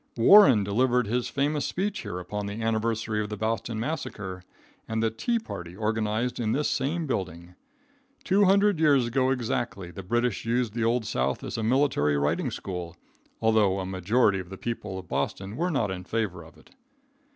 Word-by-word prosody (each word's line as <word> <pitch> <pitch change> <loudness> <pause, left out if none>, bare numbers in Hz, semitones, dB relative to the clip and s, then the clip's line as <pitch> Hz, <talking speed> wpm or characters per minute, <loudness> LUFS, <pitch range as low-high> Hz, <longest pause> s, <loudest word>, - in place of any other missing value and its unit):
Warren 125 - +7
delivered 125 +4 +2
his 120 +4 -1
famous 145 +1 0
speech 200 +3 -2
here 90 - -5
upon 100 +3 -4
the 100 +2 -5
anniversary 110 -1 -1
of 105 - -4
the 105 - -5
Boston 110 0 -2
massacre 110 - -4 0.5
and 110 0 -1
the 110 - +1
"tea 235 - -1
party" 90 - -7
organized 110 +3 -1
in 110 -2 0
this 150 +1 +1
same 155 +5 -1
building. 90 - -4 0.7
Two 200 +2 +3
hundred 200 -1 +4
years 145 -5 +4
ago 130 +2 +1
exactly, 120 -7 -2
the 85 - -8
British 120 +3 -1
used 115 -1 0
the 115 0 -1
Old 115 0 +1
South 65 -11 -1
as - - -5
a 115 - -2
military 110 - +2
riding 70 +1 0
school, 90 -3 -6 0.5
although 105 -4 +3
a 95 - -3
majority 95 +3 +2
of 90 -1 -8
the 95 - -8
people 105 -4 -4
of 95 -2 -8
Boston 95 +5 -3
were 175 +6 0
not 120 - 0
in 90 -1 -5
favor 100 -4 -2
of 80 0 -15
it. - - -21
110 Hz, 180 wpm, -27 LUFS, 95-125 Hz, 0.7 s, Warren